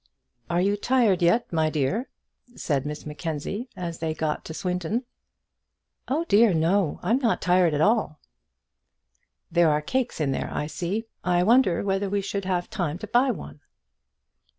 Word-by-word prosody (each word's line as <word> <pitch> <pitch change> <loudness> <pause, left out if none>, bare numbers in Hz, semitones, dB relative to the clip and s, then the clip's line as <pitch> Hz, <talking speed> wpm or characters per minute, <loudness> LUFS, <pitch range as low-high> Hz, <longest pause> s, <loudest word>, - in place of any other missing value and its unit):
"Are 170 - +1
you 200 +2 +1
tired 225 -5 +2
yet, 175 +5 +2
my 160 -1 +2
dear?" 155 - -1 0.5
said 145 -2 -1
Miss 150 0 -6
Mackenzie, 160 - -4
as 170 -2 -5
they 160 -1 -2
got 155 -1 -2
to 160 - -6
Swindon. 180 +7 -2 1.0
"Oh 300 +6 0
dear, 215 - +4
no; 165 +1 +1
I'm 235 +4 +2
not 235 -7 0
at 175 -4 +3
all 220 +5 +3
tired." 155 - -20 1.4
"There 170 -1 +4
are 150 0 +2
cakes 250 +6 -2
in 145 -3 +1
there, - - -2
I - - -2
see. 175 +8 -3 0.2
I 180 -1 +2
wonder 225 -4 +4
whether 195 0 0
we 200 +1 0
should 200 0 -4
have 180 -2 -1
time 170 -5 -3
to 205 - -7
buy 245 +5 +3
one." 75 - -5
180 Hz, 160 wpm, -25 LUFS, 160-215 Hz, 1.4 s, dear